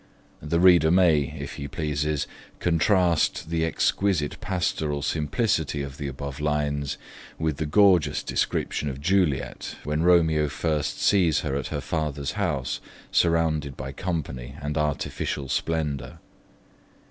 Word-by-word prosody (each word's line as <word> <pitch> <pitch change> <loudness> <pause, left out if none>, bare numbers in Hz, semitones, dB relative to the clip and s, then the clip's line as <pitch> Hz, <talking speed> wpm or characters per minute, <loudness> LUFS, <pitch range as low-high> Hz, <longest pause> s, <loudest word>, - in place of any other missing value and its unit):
The 80 +3 0
reader 85 -3 +6
may, 80 -6 +3
if - - -6
he 70 - -5
pleases, 75 0 -1 0.3
contrast 85 -1 +2
the 80 -1 +1
exquisite 80 -1 0
pastoral 80 -6 -1
simplicity 80 - 0
of 70 +2 -8
the 70 - -3
above 70 +1 -6
lines 75 -1 -1 0.4
with 80 -3 -1
the 80 - -2
gorgeous 95 0 +4
description 75 - -1
of 65 0 -6
Juliet 85 -3 0
when 75 +2 -1
Romeo 80 -3 +4
first 75 0 -1
sees 90 -7 +3
her 65 - -2
at 70 - -2
her - - -3
father's 75 -3 -2
house, 80 -9 -2 0.3
surrounded 80 -4 +1
by 65 +1 -5
company 70 -6 -4
and 75 +1 -3
artificial 75 -2 -2
splendour. 70 -5 -2
75 Hz, 125 wpm, -25 LUFS, 70-85 Hz, 0.4 s, reader